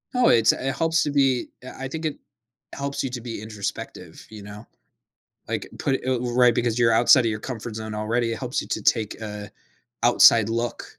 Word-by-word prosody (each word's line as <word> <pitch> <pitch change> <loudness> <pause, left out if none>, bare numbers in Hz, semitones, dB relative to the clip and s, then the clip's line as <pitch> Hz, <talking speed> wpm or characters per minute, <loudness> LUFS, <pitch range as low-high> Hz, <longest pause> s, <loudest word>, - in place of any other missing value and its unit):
Oh, 245 0 +4
it's 115 -2 +5
it 135 0 -3
helps 165 0 +1
to 145 - -2
be 135 -3 +1
I 135 +1 -8
I - - -2
think 160 +4 -6
it 155 - -2 0.6
helps 140 0 -4
you 135 - -2
to 125 -2 -5
be 115 -3 -7
introspective, 105 -2 -7
you 110 -2 -11
know? 105 +2 -11 0.8
Like, - - -3
put 135 - 0
it - - -13
oh 130 -2 0
u 120 -1 -3
right, 125 -1 +5
because 120 0 0
you're 115 -1 +4
outside 120 +2 +5
of 115 - +1
your 105 -1 -4
comfort 115 -3 -6
zone 110 -1 -6
already. 115 +2 -1
It 115 - -5
helps 125 -1 -2
you - - -12
to - - -3
take 110 -2 0
a 105 -1 -7 0.5
outside 115 -2 +6
look, 115 +1 -3
120 Hz, 215 wpm, -23 LUFS, 110-130 Hz, 0.8 s, outside